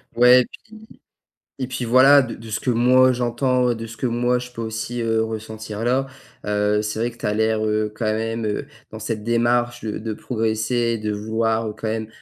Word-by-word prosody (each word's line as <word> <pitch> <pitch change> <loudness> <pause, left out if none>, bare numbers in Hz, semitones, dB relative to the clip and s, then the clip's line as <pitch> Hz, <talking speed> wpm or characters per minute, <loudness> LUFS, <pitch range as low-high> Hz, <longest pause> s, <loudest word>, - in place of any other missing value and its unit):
Ouais 125 +1 +6
puis - - -14 1.0
et 130 - -2
puis 130 -2 -4
voilà, 135 +4 +7
de 130 -4 -3
de 115 0 -11
ce 105 - -2
que - - -6
moi 125 +2 +5
j'entends, 125 +1 +1
de 115 0 -6
ce 115 - -10
que 130 - -2
moi 120 +1 +1
je 125 0 -8
peux 115 - -8
aussi, 115 +2 -4
heu, 115 -1 +1
ressentir 110 0 -6
là, 130 +3 +1 0.4
heu, 105 0 +1
c'est 105 +1 -3
vrai 120 +2 0
que 120 - -17
tu 115 - -13
as 105 - +1
l'air, 110 0 +1
heu, 105 0 0
quand 115 - -3
même, 115 +1 -2
heu, 105 -1 -2 0.2
dans - - -8
cette 110 -2 -4
démarche 120 +1 +1
de 110 -1 -4
de 110 0 -4
progresser, 115 +1 -1
de 105 0 -2
vouloir 110 +1 -1
quand 110 - -4
même 110 0 -3
115 Hz, 205 wpm, -22 LUFS, 110-120 Hz, 1.0 s, voilà